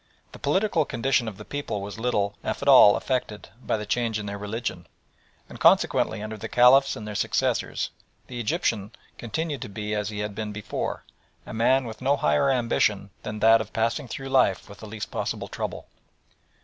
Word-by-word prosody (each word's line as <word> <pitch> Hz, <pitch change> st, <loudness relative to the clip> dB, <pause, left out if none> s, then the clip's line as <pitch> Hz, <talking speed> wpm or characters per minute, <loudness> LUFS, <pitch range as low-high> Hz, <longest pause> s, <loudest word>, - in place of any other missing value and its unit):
The -, -, -12 dB
political 190 Hz, -5 st, +1 dB
condition 125 Hz, -2 st, 0 dB
of 105 Hz, -3 st, -6 dB
the 105 Hz, -, -10 dB
people 145 Hz, -7 st, -4 dB
was 100 Hz, +2 st, -7 dB
little, 105 Hz, -4 st, 0 dB
if -, -, -3 dB
at -, -, -4 dB
all, 100 Hz, -, +9 dB
affected 125 Hz, -5 st, -3 dB
by -, -, 0 dB
the 105 Hz, -, -5 dB
change 115 Hz, 0 st, 0 dB
in 105 Hz, -, -5 dB
their 100 Hz, 0 st, -4 dB
religion; 105 Hz, -4 st, -4 dB, 0.6 s
and -, -, -11 dB
consequently, 110 Hz, -1 st, +3 dB
under 110 Hz, 0 st, -6 dB
the -, -, -6 dB
Caliphs 135 Hz, +3 st, +5 dB
and 105 Hz, -, -8 dB
their 105 Hz, -, -5 dB
successors, -, -, -1 dB, 0.3 s
the 125 Hz, -1 st, -7 dB
Egyptian 105 Hz, -2 st, -1 dB, 0.3 s
continued 145 Hz, +3 st, -3 dB
to -, -, -6 dB
be 105 Hz, +1 st, -4 dB
as 105 Hz, -1 st, -1 dB
he 105 Hz, -, -6 dB
had 105 Hz, 0 st, -4 dB
been 105 Hz, +1 st, -4 dB
before 105 Hz, 0 st, -4 dB, 0.4 s
a -, -, -8 dB
man 125 Hz, +4 st, +3 dB
with 110 Hz, 0 st, -8 dB
no 140 Hz, +2 st, +2 dB
higher 75 Hz, -, +2 dB
ambition 110 Hz, -6 st, +1 dB
than 105 Hz, 0 st, -6 dB
that 115 Hz, +1 st, +6 dB
of 110 Hz, -, -8 dB
passing 115 Hz, +3 st, 0 dB
through 135 Hz, +3 st, -6 dB
life 130 Hz, -8 st, +2 dB
with 100 Hz, -1 st, -13 dB
the 110 Hz, -, -9 dB
least 105 Hz, 0 st, -6 dB
possible -, -, -3 dB
trouble. -, -, -5 dB
110 Hz, 190 wpm, -25 LUFS, 105-125 Hz, 0.6 s, all